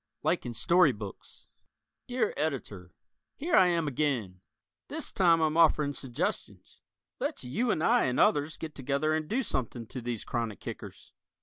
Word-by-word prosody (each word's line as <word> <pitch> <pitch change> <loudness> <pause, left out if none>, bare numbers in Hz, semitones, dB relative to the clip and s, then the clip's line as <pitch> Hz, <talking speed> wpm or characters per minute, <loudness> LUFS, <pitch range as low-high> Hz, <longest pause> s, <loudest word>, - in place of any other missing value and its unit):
"Like - - 0
in 120 - -5
Story 155 +5 +4
Books" 105 -2 -10 0.6
Dear 245 -3 0
Editor: 120 - -4 0.4
Here 330 +5 0
I 185 - +7
am 170 -3 +1
again! 125 -10 -1 0.5
This - - -4
time 170 -3 +4
I'm 155 -1 +1
offering 155 -3 +4
suggestions. 130 -4 -4 0.4
Let's - - -3
you 150 - -1
and 160 -7 +1
I 235 +5 +4
and 125 - 0
others 150 +1 +3
get 155 -2 -6
together 140 +3 0
and 155 -1 -2
do 260 +5 +1
something 120 - -3
to 125 +3 -7
these 120 -2 -4
chronic 115 -4 -3
kickers. - - -9
145 Hz, 155 wpm, -29 LUFS, 120-165 Hz, 0.6 s, I